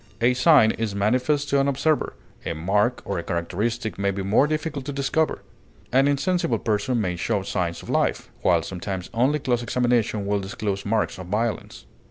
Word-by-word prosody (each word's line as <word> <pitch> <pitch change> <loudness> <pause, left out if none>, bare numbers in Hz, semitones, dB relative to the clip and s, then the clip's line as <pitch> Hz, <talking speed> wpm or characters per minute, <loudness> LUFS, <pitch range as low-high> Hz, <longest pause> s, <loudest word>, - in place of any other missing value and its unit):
A 120 +2 +4
sign 130 -3 +5
is 110 -3 -3
manifest 130 +8 +1
to 140 - +3
an 135 - +2
observer; 140 - 0 0.3
a - - -3
mark 105 +9 +1
or 100 -3 -2
a - - -5
characteristic 100 +7 -2
may 100 0 +1
be 100 0 -3
more 110 +9 +3
difficult 155 -2 -2
to 145 - -3
discover; 140 +3 0 0.5
an 135 +2 +4
insensible 170 +5 +1
person 110 +3 0
may 90 -4 -1
show 100 +3 -1
signs 85 -3 -2
of - - -11
life, - - 0
while 85 -3 +3
sometimes 95 +1 -5
only 130 +6 +2
close 125 -4 0
examination 120 -4 0
will 100 0 +1
disclose 100 +1 -4
marks 110 -3 0
of 90 - -7
violence. 110 - -2
115 Hz, 180 wpm, -24 LUFS, 100-135 Hz, 0.5 s, sign